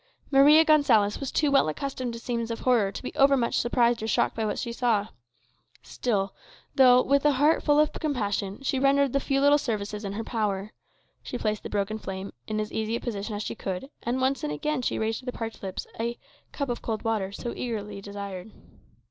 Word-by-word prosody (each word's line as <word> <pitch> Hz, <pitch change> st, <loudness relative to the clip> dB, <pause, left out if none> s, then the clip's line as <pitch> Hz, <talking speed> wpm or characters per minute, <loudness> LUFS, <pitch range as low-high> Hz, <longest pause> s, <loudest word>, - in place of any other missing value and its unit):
Maria 295 Hz, +4 st, +7 dB
Gonsalez 255 Hz, -10 st, +4 dB
was 275 Hz, -, -4 dB
too 295 Hz, -2 st, +1 dB
well 275 Hz, -, +4 dB
accustomed 255 Hz, -, -4 dB
to 230 Hz, -, -6 dB
scenes 235 Hz, -1 st, -3 dB
of 230 Hz, -, -4 dB
horror 230 Hz, -6 st, +3 dB
to 195 Hz, -, -8 dB
be -, -, -5 dB
over 275 Hz, 0 st, +5 dB
much 235 Hz, -2 st, +1 dB
surprised 240 Hz, -1 st, +2 dB
or 220 Hz, -, -3 dB
shocked 220 Hz, -, +1 dB
by 225 Hz, -, -2 dB
what 210 Hz, -2 st, -1 dB
she 235 Hz, -2 st, -3 dB
saw. 225 Hz, -4 st, +1 dB, 0.7 s
Silently, 200 Hz, -5 st, -2 dB, 0.4 s
though 255 Hz, -1 st, +6 dB
with 280 Hz, +1 st, +2 dB
a 295 Hz, -1 st, +4 dB
heart 290 Hz, +4 st, +3 dB
full 295 Hz, 0 st, +3 dB
of 305 Hz, 0 st, +3 dB
compassion, 205 Hz, -, -2 dB
she 265 Hz, -1 st, 0 dB
rendered 275 Hz, 0 st, +3 dB
the 275 Hz, -, +3 dB
few 275 Hz, 0 st, 0 dB
little 285 Hz, +1 st, +5 dB
services 210 Hz, -4 st, -3 dB
in 200 Hz, -1 st, -4 dB
her 225 Hz, +3 st, -4 dB
power. 210 Hz, -3 st, -2 dB, 0.5 s
She 245 Hz, -, -5 dB
placed 215 Hz, -2 st, -1 dB
the -, -, -7 dB
broken 205 Hz, +2 st, -2 dB
frame 190 Hz, -1 st, -6 dB
in 215 Hz, 0 st, -2 dB
as 215 Hz, 0 st, -4 dB
easy 220 Hz, +1 st, -1 dB
a -, -, -2 dB
position 210 Hz, -2 st, -4 dB
as 205 Hz, -, -3 dB
she -, -, -4 dB
could, 195 Hz, +6 st, -5 dB
and 245 Hz, +2 st, -1 dB
once 265 Hz, +1 st, 0 dB
and 150 Hz, -, -2 dB
again 280 Hz, -, -2 dB
she -, -, -1 dB
raised 220 Hz, 0 st, -1 dB
to 255 Hz, -, -15 dB
the -, -, -1 dB
parched 225 Hz, -2 st, -6 dB
lips 190 Hz, -1 st, -5 dB
the 235 Hz, +1 st, -2 dB, 0.3 s
"cup 280 Hz, -2 st, -3 dB
of 240 Hz, -, -3 dB
cold 220 Hz, -2 st, -3 dB
water" 215 Hz, -4 st, -1 dB
so 235 Hz, +4 st, -5 dB
eagerly 210 Hz, -4 st, -4 dB
desired. 200 Hz, -1 st, -7 dB
230 Hz, 215 wpm, -27 LUFS, 205-270 Hz, 0.7 s, Maria